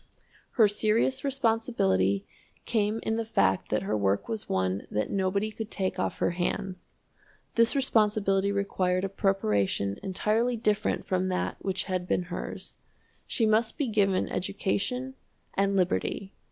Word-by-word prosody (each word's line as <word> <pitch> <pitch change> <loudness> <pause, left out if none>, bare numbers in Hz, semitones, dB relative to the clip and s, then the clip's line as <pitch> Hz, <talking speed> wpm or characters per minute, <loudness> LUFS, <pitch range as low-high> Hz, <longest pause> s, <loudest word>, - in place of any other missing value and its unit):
Her 220 -4 +6
serious 220 +6 +1
responsibility 225 - +1 0.4
came 220 -1 0
in 220 - 0
the 230 - 0
fact 95 - +1
that 105 -1 0
her 105 +2 -1
work 100 -1 +1
was 220 -2 -3
one 95 +1 -1
that 105 - -1
nobody 200 +2 0
could 220 0 -6
take 190 -4 -2
off - - -1
her - - +1
hands. 185 +1 -3 0.6
This 230 +3 +4
responsibility 210 -6 +2
required 185 -2 0
a 195 - -1
preparation 105 - 0
entirely 220 +5 0
different 210 -2 0
from 185 0 0
that 185 -1 -1
which 190 -1 -2
had 185 -2 -3
been 180 - +1
hers. - - -6 0.5
She 230 - +1
must 220 +1 +2
be 290 - +1
given 200 -4 +2
education 215 +7 -2 0.4
and 195 0 +1
liberty. 190 +1 0
200 Hz, 140 wpm, -28 LUFS, 180-220 Hz, 0.6 s, Her